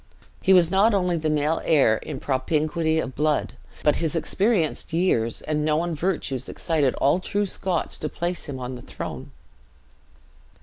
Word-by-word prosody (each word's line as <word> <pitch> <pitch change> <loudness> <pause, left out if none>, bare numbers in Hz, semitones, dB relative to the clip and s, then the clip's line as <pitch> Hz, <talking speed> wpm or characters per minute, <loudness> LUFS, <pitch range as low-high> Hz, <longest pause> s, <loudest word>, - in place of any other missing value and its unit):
He 190 - +2
was 175 -3 +6
not 205 +3 +4
only 180 -2 +1
the 155 -1 -1
male 150 +1 +1
heir 135 -8 +4
in 145 +2 -7
propinquity 155 +4 0
of 135 -4 -2
blood, 150 +2 0 0.3
but 150 - +3
his 165 0 -1
experienced 185 -1 0
years 120 -10 +1
and 150 -1 -1
known 160 +3 0
virtues 150 -6 -2
excited 150 -6 0
all 145 +6 +2
true 205 +2 -1
Scots 185 -2 -2
to 155 - -3
place 175 +1 -3
him 140 -2 -6
on 125 0 -5
the 125 - -8
throne. - - -7
155 Hz, 160 wpm, -24 LUFS, 145-175 Hz, 0.3 s, was